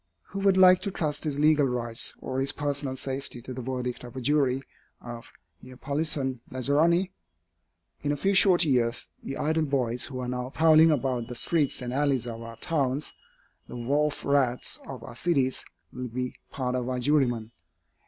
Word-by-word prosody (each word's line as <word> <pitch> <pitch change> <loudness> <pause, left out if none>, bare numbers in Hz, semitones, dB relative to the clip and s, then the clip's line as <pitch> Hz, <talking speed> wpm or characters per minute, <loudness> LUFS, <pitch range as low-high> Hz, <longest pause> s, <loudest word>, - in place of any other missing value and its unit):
Who 195 - -5
would 195 -1 +3
like 185 -1 +7
to 205 - -3
trust 155 -5 -2
his 145 -2 -1
legal 150 -1 +4
rights 120 -2 -1
or 130 0 -3
his 135 +1 0
personal 140 -2 -2
safety 135 -1 -4
to 130 - -6
the 130 - -5
verdict 125 -1 -4
of 120 +1 -10
a - - -3
jury 135 -1 +1 0.4
of 120 -1 -9 0.3
Neapolitan 135 0 -1
lazzaroni? 160 +8 +2 0.9
In 145 - 0
a 145 - -1
few 195 +7 +1
short 185 -3 +5
years, 120 -4 +1
the 135 - -5
idle 160 +1 +1
boys 125 -3 +1
who 135 - -6
are 125 - -3
now 125 0 -3
prowling 160 +2 +6
about 130 -5 0
the 125 - -7
streets 145 -1 +1
and 125 0 -4
alleys 140 -3 +1
of 115 -1 -6
our 115 0 -8
towns, 140 -3 -1 0.5
the - - -8
wharf 145 +5 0
rats 135 -3 +1
of 130 -4 -8
our 120 - -9
cities, 135 -3 +1 0.3
will 125 0 -5
be 125 +2 -4
a - - -29
part 125 -2 -2
of 125 0 -2
our 130 - -1
jurymen. 125 -5 +1
135 Hz, 180 wpm, -27 LUFS, 125-150 Hz, 0.9 s, like